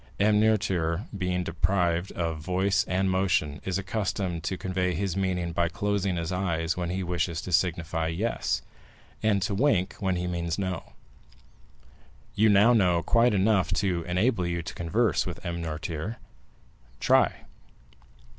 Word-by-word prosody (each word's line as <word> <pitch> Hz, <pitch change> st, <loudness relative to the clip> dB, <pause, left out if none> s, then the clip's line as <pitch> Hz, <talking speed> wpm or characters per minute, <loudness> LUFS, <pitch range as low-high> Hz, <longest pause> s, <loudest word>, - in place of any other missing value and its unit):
M. 105 Hz, +1 st, +4 dB
Noirtier, 95 Hz, -4 st, +1 dB
being 90 Hz, -2 st, -1 dB
deprived 85 Hz, +1 st, 0 dB
of 85 Hz, -2 st, -2 dB
voice 95 Hz, +4 st, +1 dB
and 95 Hz, +1 st, 0 dB
motion, 90 Hz, -6 st, 0 dB
is 95 Hz, -1 st, -1 dB
accustomed 95 Hz, -3 st, -2 dB
to 95 Hz, 0 st, -2 dB
convey 90 Hz, -1 st, -1 dB
his 95 Hz, +1 st, -2 dB
meaning 90 Hz, -3 st, -1 dB
by 85 Hz, +1 st, +1 dB
closing 100 Hz, +1 st, -1 dB
his 85 Hz, +1 st, -3 dB
eyes 85 Hz, -3 st, -1 dB
when 90 Hz, -1 st, -3 dB
he 95 Hz, +1 st, -2 dB
wishes 85 Hz, -2 st, -1 dB
to 90 Hz, -, -6 dB
signify 80 Hz, -1 st, 0 dB
'yes,' 80 Hz, -, -1 dB, 0.6 s
and 105 Hz, -3 st, +2 dB
to 105 Hz, -1 st, -1 dB
wink 100 Hz, -5 st, +2 dB
when 95 Hz, -2 st, 0 dB
he 90 Hz, 0 st, -2 dB
means 85 Hz, -2 st, -2 dB
'no.' 95 Hz, -2 st, -4 dB, 1.4 s
You 110 Hz, +1 st, +4 dB
now 105 Hz, +4 st, +6 dB
know 90 Hz, -6 st, +3 dB
quite 115 Hz, -1 st, +3 dB
enough 100 Hz, -1 st, +2 dB
to 95 Hz, -4 st, 0 dB
enable 90 Hz, +2 st, +1 dB
you 85 Hz, -1 st, -2 dB
to -, -, -6 dB
converse 85 Hz, +3 st, +1 dB
with -, -, -7 dB
M. 85 Hz, 0 st, -3 dB
Noirtier;—try." 80 Hz, +5 st, -3 dB
90 Hz, 145 wpm, -27 LUFS, 85-100 Hz, 1.4 s, now